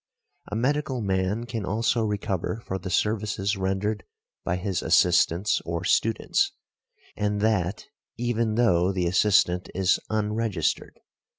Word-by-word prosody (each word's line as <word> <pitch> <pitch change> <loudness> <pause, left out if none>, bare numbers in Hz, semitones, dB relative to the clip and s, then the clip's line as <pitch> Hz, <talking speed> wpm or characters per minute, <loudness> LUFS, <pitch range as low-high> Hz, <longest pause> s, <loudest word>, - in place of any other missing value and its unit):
A 105 - -5
medical 135 +2 0
man 95 +2 -1
can 115 -3 -4
also 110 +4 0
recover 105 0 -2
for 95 - -3
the 95 +1 -6
services 105 +1 0
rendered 95 +2 -1 0.4
by 85 - -1
his 95 0 -2
assistants 95 +6 +3
or 85 0 -3
students; 115 -1 +1 0.6
and 105 0 -1
that 105 -3 0 0.3
even 115 -2 0
though 95 -6 +3
the 90 -2 -1
assistant 90 -1 +3
is 95 0 +2
unregistered. 105 -4 -1
105 Hz, 120 wpm, -26 LUFS, 95-110 Hz, 0.6 s, assistants